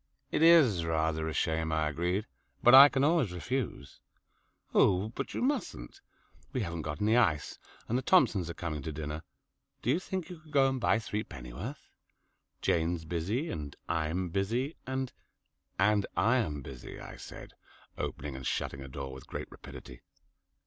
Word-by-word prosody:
"It - - 0
is 155 - +6
rather 80 -1 0
a 80 - -3
shame," 80 0 0
I 80 -1 +1
agreed, 90 +7 -1 0.4
"but 120 - +7
I 140 +2 +12
can 135 -1 +1
always 150 - +3
refuse." 90 - -4 0.7
"Oh, 95 +3 +4
but 135 +4 -5
you - - -1
mustn't. 240 - -2 0.5
We 130 - 0
haven't 85 -5 -3
got 75 +2 -4
any 110 +2 +4
ice, 85 -12 +2 0.3
and 120 +3 +1
the - - -3
Thompsons 115 - +3
are 85 - -5
coming 80 -4 -4
to 80 - -4
dinner. 75 +1 -5 0.6
Do 120 - +2
you 160 - +2
think 185 -2 -4
you 175 - -9
could 155 -1 -18
go 135 -1 +5
and 130 -2 -3
buy 110 - +3
threepennyworth? 105 - -6 0.7
Jane's 85 0 +1
busy, 95 - -2
and 75 -2 -5
I'm 85 +3 -1
busy, 115 - -1
and 130 -1 -2 0.3
" - - -45
"And 100 -2 +1
I'm 110 - +2
busy," 65 -1 -9
I - - -9
said, - - -10 0.4
opening 70 0 -4
and 65 0 -5
shutting 70 - -2
a 70 - -7
drawer 65 0 -6
with 65 - -11
great - - -6
rapidity. - - -11
90 Hz, 165 wpm, -31 LUFS, 80-130 Hz, 0.7 s, I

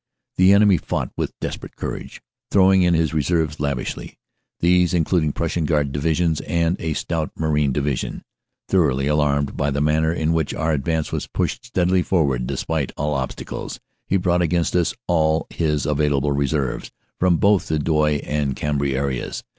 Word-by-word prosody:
The 95 +1 +6
enemy 100 -2 +5
fought - - -3
with - - -4
desperate - - -6
courage, - - -6 0.3
throwing 95 -1 +5
in 90 -1 +3
his 80 -1 +1
reserves 80 0 0
lavishly, 70 -3 -3 0.4
these 90 0 +3
including 80 -2 +1
Prussian 85 +2 -2
Guard 75 -3 +1
divisions 80 +3 0
and 85 0 +1
a 80 -1 -2
stout 80 0 -2
Marine 75 -3 +1
division. 70 -1 -2 0.4
Thoroughly 65 +1 +2
alarmed 70 -1 +1
by 70 - 0
the 70 0 -1
manner 80 +2 +2
in 80 -1 0
which 80 -3 -1
our 80 +1 0
advance 80 +2 -1
was - - -3
pushed 120 - -2
steadily 95 -5 +1
forward 70 -9 0
despite 80 -4 -2
all 75 +1 -1
obstacles, 65 -2 -5 0.3
he 95 - +2
brought 90 -1 +1
against 85 0 0
us 85 -2 +1
all 80 -2 +2
his 75 -4 0
available 75 -1 +1
reserves, 70 -1 -1 0.3
from 90 -2 +3
both 100 +1 +3
the 80 - 0
Douai 75 -1 +1
and 75 -3 -1
Cambrai 70 -2 -1
areas. 70 -2 -3
80 Hz, 160 wpm, -21 LUFS, 70-85 Hz, 0.4 s, The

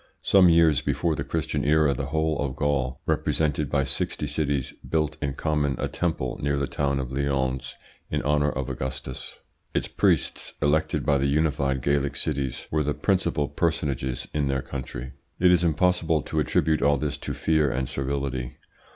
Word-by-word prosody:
Some 95 -3 +6
years 80 -4 +5
before 85 -2 0
the - - -3
Christian 80 -2 -2
era 75 -1 +4
the 70 0 -3
whole 80 +1 0
of 70 -2 -2
Gaul, 70 -4 0
represented 75 -2 0
by 70 -1 +2
sixty 65 +2 -2
cities, 70 -2 -1 0.2
built 75 -1 0
in 70 -2 -2
common 75 -3 0
a - - -1
temple 80 -7 -2
near 70 0 0
the 70 - 0
town 70 0 -1
of 65 -1 -4
Lyons 65 -1 -1 0.3
in - - -1
honour 75 +1 +2
of 65 -3 -3
Augustus.... 65 0 -5 0.4
Its - - 0
priests, - - +1
elected 75 +1 +1
by 70 -2 +3
the 70 - +1
united 70 -3 +1
Gallic 70 -1 +1
cities, 70 -4 -2
were 75 - +2
the 75 0 -1
principal 85 -7 +1
personages 70 -7 -1
in 75 -2 0
their 65 -1 -1
country.... 65 -1 -6 0.3
It 90 0 +6
is 90 -1 +4
impossible 80 -1 +2
to 80 - -2
attribute 75 +2 +1
all 70 0 +4
this 75 +1 -2
to - - -5
fear 80 -2 +2
and 65 0 -1
servility. 65 -2 -3
70 Hz, 170 wpm, -25 LUFS, 65-80 Hz, 0.4 s, Some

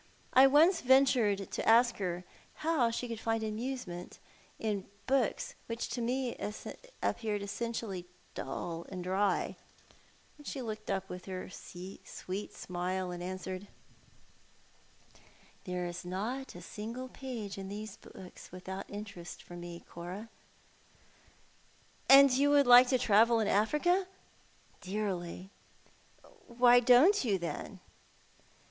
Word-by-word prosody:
I 265 +1 +8
once 320 +6 +5
ventured 245 -7 +3
to - - -1
ask 235 +1 +5
her 180 -2 -3 0.4
how 310 -8 +3
she 235 +2 -3
could 230 -2 -5
find 225 0 -1
enjoyment 215 -5 -5 0.4
in 205 -3 -2 0.2
books 275 - 0
which 230 0 -3
to 245 - -3
me 250 +1 -1 0.7
appeared 210 -3 -1
essentially 200 -3 -4 0.3
dull 170 -1 -5
and 185 -2 -5
dry, 190 +1 0 0.8
and 295 - -12
she 275 - -4
looked 215 -2 -6
up 195 -1 -1
with 180 -1 -8
her 185 -1 -6
sweet 185 +2 -7
smile, 180 +1 -3
and 175 0 -6
answered 185 +1 -5 0.7
— - - -32
" - - -27
There 180 -1 -2
is 175 +1 -5
not 215 +9 -4
a 175 - -9
single 230 +7 -6
page 235 -7 -6
in 195 0 -6
these 210 0 -7
books 185 -1 -12
without 190 +2 -7
interest 205 -4 -8
for 175 - -11
me, 175 0 -8
Cora." 180 +6 -7 0.8
" - - -31
And 275 +1 +10
would 250 - +2
you 285 0 +5
like 245 0 +9
to 255 - +3
travel 230 0 +4
in 220 - +1
Africa? 325 - +2 0.2
" - - -32
" - - -31
Dearly." 190 -2 -4 0.6
" 435 -6 -24
Why 245 0 +7
don't 255 - +6
you, 210 -6 +1
then 175 -2 -6
215 Hz, 135 wpm, -32 LUFS, 185-250 Hz, 0.8 s, And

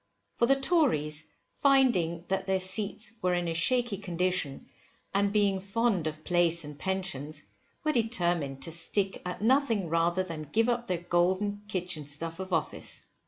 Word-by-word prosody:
For 235 - +2
the 275 - +5
Tories, 155 - +1 0.3
finding 225 - +3
that 190 0 -1
their 190 0 +2
seats 200 +3 -1
were 180 0 +2
in 175 -1 -1
a 165 - -1
shaky 240 +6 +1
condition, 180 -6 -2 0.5
and 200 0 +2
being 200 -2 +2
fond 195 -3 0
of 155 0 -5
place 170 -1 +2
and 150 0 -8
pensions, 155 -5 -2 0.4
were 310 - +2
determined 175 - 0
to 165 - -4
stick 190 +4 -1
at 180 +3 -5
nothing 230 - +2
rather 170 +3 +2
than 155 -5 -7
give 225 +2 +3
up 240 0 -1
their 180 - 0
golden 185 +4 +1
kitchen 180 -7 -3
stuff 165 +4 -4
of 190 0 -6
office. 165 -3 -2
185 Hz, 160 wpm, -29 LUFS, 165-210 Hz, 0.5 s, the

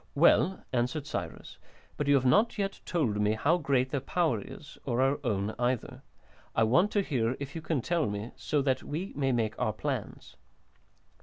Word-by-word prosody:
"Well," 170 +4 +4
answered 125 +4 0
Cyrus, 85 - -6 0.4
"but 145 - -2
you 145 - +5
have 130 -1 +2
not 210 - +5 0.4
told 120 - 0
me 105 - +3
yet 110 - -5
how 165 +5 +4
great 130 -4 +1
their 140 - 0
power 155 - 0
is, 150 - -11
or 120 -2 -1
our 135 +2 +2
own 105 -3 -1
either. 125 -1 -1 0.5
I 115 - +4
want 150 - +4
to 205 - +2
hear, 125 -6 0
if 140 +1 -6
you 165 - -4
can 155 -4 -1
tell 170 +3 0
me, 105 +4 -4
so 145 -3 0
that 130 -2 +1
we 170 +7 -5
may 135 -2 +1
make 115 -3 0
our 110 -4 0
plans." 130 -1 -5
135 Hz, 185 wpm, -29 LUFS, 115-155 Hz, 0.5 s, you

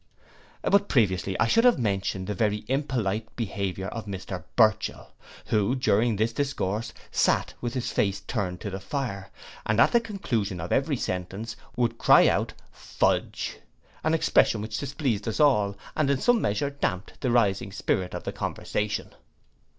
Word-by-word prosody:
But 200 0 +3
previously 95 -6 +1
I 110 - +4
should 230 - +4
have 245 -1 +6
mentioned 100 -4 -1
the 105 - -2
very 105 +1 0
impolite 115 -6 -1
behaviour 100 -4 -3
of 110 -1 -6
Mr 95 -3 -5
Burchell, 110 -2 +2 0.3
who, 105 +4 +1
during 120 -3 +2
this 110 +3 0
discourse, 115 -5 -2 0.2
sate - - +2
with 120 0 -3
his 125 - -2
face 100 -1 0
turned 100 -5 -3
to 100 - -4
the 95 - -4
fire, 100 -5 -4 0.3
and 110 +1 0
at - - +6
the 235 - +5
conclusion 120 - -2
of 85 +1 -5
every 140 0 +1
sentence 95 +4 -4 0.2
would 115 -1 0
cry - - +7
out - - +1 0.2
fudge! - - -1 0.4
an 160 +1 +2
expression 115 -7 +3
which 110 0 -4
displeased 135 -7 -2
us 110 - -2
all, 105 -10 +3 0.2
and 155 -3 +1
in 140 -2 +2
some 245 - +3
measure 105 +8 0
damped 100 -9 -3
the 130 - 0
rising 105 -5 +2
spirit 90 -1 -1
of - - -5
the - - -3
conversation. 105 -1 -3
110 Hz, 160 wpm, -26 LUFS, 100-130 Hz, 0.4 s, cry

